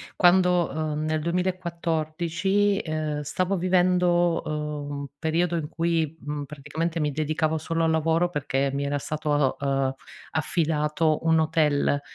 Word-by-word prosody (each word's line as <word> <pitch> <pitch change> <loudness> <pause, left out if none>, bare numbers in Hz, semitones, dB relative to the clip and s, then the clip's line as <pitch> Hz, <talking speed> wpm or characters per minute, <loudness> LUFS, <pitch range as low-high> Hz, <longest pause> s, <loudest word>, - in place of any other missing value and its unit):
quando, 180 -1 +4
uhm, 155 0 -2
nel 155 0 0
2014, 175 +2 0
ehm, 155 -2 -2
stavo 185 +6 -1
vivendo, 180 -1 +2
uhm, 150 -1 -4
un 140 - -5
periodo 165 +3 0
in 155 -2 -3
cui, 165 -2 -1
mhmm, 145 0 -4
praticamente 155 +4 -4
mi 150 -1 0
dedicavo 155 +2 0
solo 165 +1 -1
al 160 - +2
lavoro 165 +2 +2
perché 140 -4 -1
mi 140 +1 -1
era 145 0 -1
stato, 150 -2 0
uhm, 135 -1 0 0.4
affidato 155 0 +1
un 160 0 +4
hotel 155 -3 +2
160 Hz, 135 wpm, -25 LUFS, 150-170 Hz, 0.4 s, quando